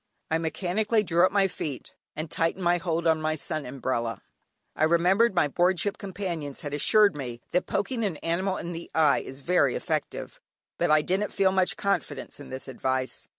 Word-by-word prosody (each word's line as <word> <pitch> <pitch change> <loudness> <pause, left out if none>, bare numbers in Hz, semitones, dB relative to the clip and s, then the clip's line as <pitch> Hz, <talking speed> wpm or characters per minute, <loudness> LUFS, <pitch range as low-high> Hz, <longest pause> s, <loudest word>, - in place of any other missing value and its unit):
I 160 - +2
mechanically 200 +7 0
drew 175 -1 +4
up - - -7
my 195 -1 +3
feet, 145 -7 -6 0.2
and 155 0 -5
tightened 165 +3 0
my 175 0 +3
hold 170 -1 -1
on 160 -1 +3
my 155 0 0
sun 155 -1 -4
umbrella; 125 -3 -3 0.5
I - - 0
remembered 185 +7 +3
my 175 -4 +4
board 180 +4 +2
ship 205 +1 -1
companions 180 -8 -5
had 145 -1 -5
assured 205 +5 +5
me 125 -4 -5
that 180 - +1
poking 230 +3 -1
an 190 -7 -1
animal 185 +4 -1
in 175 - -5
the 170 0 -7
eye 155 -3 +4
is 135 +1 -8
very 170 -6 +3
effective, - - -3 0.4
but - - +2
I 155 0 +5
didn't 195 +5 -1
feel 195 -1 +3
much 190 -1 +1
confidence 200 -6 -2
in 145 - -10
this 130 0 -6
advice. 130 0 -2
170 Hz, 190 wpm, -27 LUFS, 150-190 Hz, 0.5 s, assured